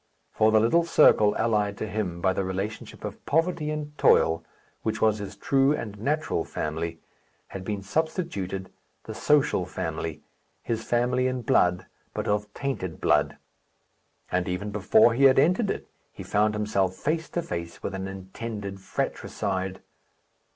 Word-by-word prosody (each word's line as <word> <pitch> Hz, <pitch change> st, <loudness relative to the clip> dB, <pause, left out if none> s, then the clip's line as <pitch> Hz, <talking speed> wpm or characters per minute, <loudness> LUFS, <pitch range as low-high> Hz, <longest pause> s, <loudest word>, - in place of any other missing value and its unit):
For 110 Hz, 0 st, +3 dB
the 110 Hz, -, +5 dB
little 120 Hz, +10 st, +4 dB
circle 110 Hz, -10 st, +5 dB
allied 105 Hz, -3 st, +1 dB
to -, -, -3 dB
him 95 Hz, -5 st, -3 dB
by 95 Hz, 0 st, +3 dB
the 95 Hz, -, -1 dB
relationship 95 Hz, +3 st, -5 dB
of -, -, -7 dB
poverty 165 Hz, 0 st, +1 dB
and 150 Hz, -1 st, -4 dB
toil, 80 Hz, 0 st, +4 dB, 0.4 s
which 110 Hz, 0 st, -2 dB
was 110 Hz, -1 st, +3 dB
his 100 Hz, -, -6 dB
true 135 Hz, +1 st, +3 dB
and 105 Hz, -6 st, -6 dB
natural 145 Hz, -, 0 dB
family, 80 Hz, +2 st, -4 dB, 0.5 s
had 95 Hz, -, -7 dB
been 100 Hz, 0 st, -3 dB
substituted 100 Hz, -, -2 dB, 0.3 s
the -, -, -7 dB
social 145 Hz, -9 st, +2 dB
family 80 Hz, -2 st, -4 dB, 0.4 s
his 115 Hz, -1 st, -2 dB
family 125 Hz, +2 st, +1 dB
in 130 Hz, -1 st, -2 dB
blood, 90 Hz, -3 st, +3 dB, 0.3 s
but -, -, -2 dB
of 105 Hz, 0 st, 0 dB
tainted 130 Hz, -12 st, -3 dB
blood; -, -, +2 dB, 0.9 s
and 90 Hz, 0 st, 0 dB
even 95 Hz, +3 st, -3 dB
before 105 Hz, +3 st, +4 dB
he 135 Hz, +4 st, +4 dB
had 130 Hz, -1 st, +6 dB
entered 180 Hz, -, +3 dB
it, -, -, -3 dB, 0.2 s
he -, -, -9 dB
found 105 Hz, +1 st, +1 dB
himself 100 Hz, -3 st, 0 dB
face 160 Hz, -, -2 dB
to 175 Hz, -, -2 dB
face 85 Hz, -, -6 dB
with -, -, -3 dB
an 95 Hz, 0 st, -4 dB
intended 95 Hz, +1 st, -6 dB
fractricide. 95 Hz, 0 st, -3 dB
105 Hz, 150 wpm, -26 LUFS, 95-130 Hz, 0.9 s, had